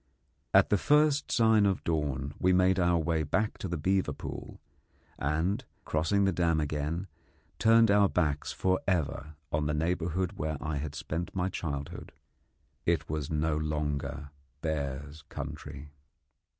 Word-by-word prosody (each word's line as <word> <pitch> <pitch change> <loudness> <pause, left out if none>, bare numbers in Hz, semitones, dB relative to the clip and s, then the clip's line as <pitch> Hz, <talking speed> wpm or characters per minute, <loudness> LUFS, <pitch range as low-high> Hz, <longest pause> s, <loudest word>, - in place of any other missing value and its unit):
At - - +5
the 105 - +3
first 150 +2 +3
sign 110 -3 +5
of 95 - 0
dawn 70 -4 -1
we 90 0 +3
made 95 +1 +4
our 85 -1 +3
way 80 0 0
back 105 +8 -1
to - - -3
the 85 -1 -2
beaver 95 -1 +1
pool, - - -7 0.6
and, 85 - 0 0.2
crossing 100 +6 +2
the 95 - +3
dam 85 -3 +2
again, 75 +4 -2 0.5
turned 115 -1 +6
our 100 -1 +5
backs 75 -4 0
for 95 0 +1
ever 80 -4 -1 0.2
on 75 0 0
the 75 - 0
neighbourhood 85 +2 0
where 75 0 -1
I 80 -2 -3
had 75 +1 -4
spent 80 +5 -4
my 90 0 0
childhood. 70 -6 -5 0.7
It - - 0
was 75 -3 -2
no 75 0 0
longer 75 -2 -2 0.3
bears' 75 -1 -3
country. 70 +1 -7
80 Hz, 145 wpm, -30 LUFS, 75-95 Hz, 0.7 s, turned